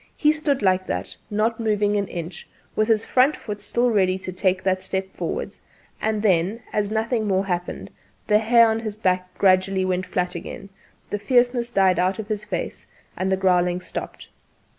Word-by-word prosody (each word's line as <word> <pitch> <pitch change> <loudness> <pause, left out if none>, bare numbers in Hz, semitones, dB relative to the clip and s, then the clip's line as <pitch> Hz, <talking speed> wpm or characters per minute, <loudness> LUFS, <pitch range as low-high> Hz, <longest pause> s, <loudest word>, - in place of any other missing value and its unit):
He 300 - +4
stood 295 -5 -1
like 185 -1 +2
that, 90 +2 -4
not 220 +2 0
moving 210 -2 +1
an 200 -1 0
inch, 170 0 -7 0.3
with 215 - +2
the 225 -2 +4
front 255 +6 +2
foot 210 -2 -7
still 240 0 +1
ready 190 -3 +2
to 185 -1 -7
take 185 0 0
that 185 -1 +1
step 190 0 -3
forward; - - -3 0.5
and 215 -1 0
then, 195 +3 +2
as 205 -1 0
nothing 220 0 0
more 195 0 +1
happened, 180 -2 -4 0.3
the 210 -1 +4
hair 230 +1 +5
on 220 0 0
his 215 -2 -5
back 185 -3 -1
gradually 190 0 +3
went 185 0 -1
flat 180 0 -1
again; 175 +3 -8 0.4
the 205 - -1
fierceness 245 +2 +2
died 190 -6 +3
out 185 +2 +1
of 220 -2 -6
his 215 -1 -2
face; - - -5 0.3
and 190 +1 -1
the 190 - +2
growling 180 -1 +2
stopped. 180 - -7
200 Hz, 185 wpm, -23 LUFS, 185-220 Hz, 0.5 s, hair